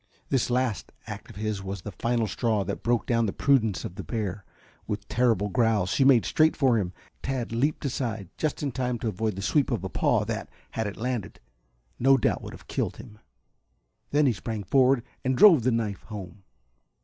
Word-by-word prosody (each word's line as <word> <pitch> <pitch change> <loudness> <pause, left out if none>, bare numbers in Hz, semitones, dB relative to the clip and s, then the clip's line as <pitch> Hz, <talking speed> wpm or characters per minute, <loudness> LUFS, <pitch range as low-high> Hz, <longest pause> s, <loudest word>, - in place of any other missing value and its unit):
This 130 -3 +1
last 125 -3 -1
act - - -8
of - - -12
his 105 -1 -2
was 95 -1 -6
the 105 - -6
final 115 +4 0
straw 110 0 0
that - - -4
broke 120 -1 +1
down 115 -2 +2
the - - -1
prudence 115 -8 +2
of - - -6
the 95 +1 -7
bear. 105 -4 -3 0.4
With 105 -1 -4
terrible 110 -2 +2
growls 110 -4 +1
she 135 - +3
made 130 -4 +5
straight 160 0 +3
for 130 -6 +3
him. 90 -3 -2 0.3
Tad 130 -4 -3
leaped 140 +7 0
aside 115 -7 -2
just 155 -1 -2
in 140 - -1
time 125 -1 -1
to 115 - -4
avoid 110 +1 -2
the 95 - -5
sweep 140 +6 +2
of 115 -8 -1
a 95 - -3
paw - - +1
that, - - -4 0.2
had 110 -2 -2
it 100 - -6
landed, 125 -3 -3 0.6
no 135 +2 +5
doubt - - +1
would - - -8
have - - -12
killed - - -2
him. 105 - -12 0.9
Then 150 +1 +3
he 130 - +3
sprang 110 0 -5
forward 130 +4 +3 0.2
and 130 0 0
drove 170 -4 +8
the 125 +3 +2
knife 110 -4 -1
home. 100 -2 -8
115 Hz, 200 wpm, -27 LUFS, 105-130 Hz, 0.9 s, drove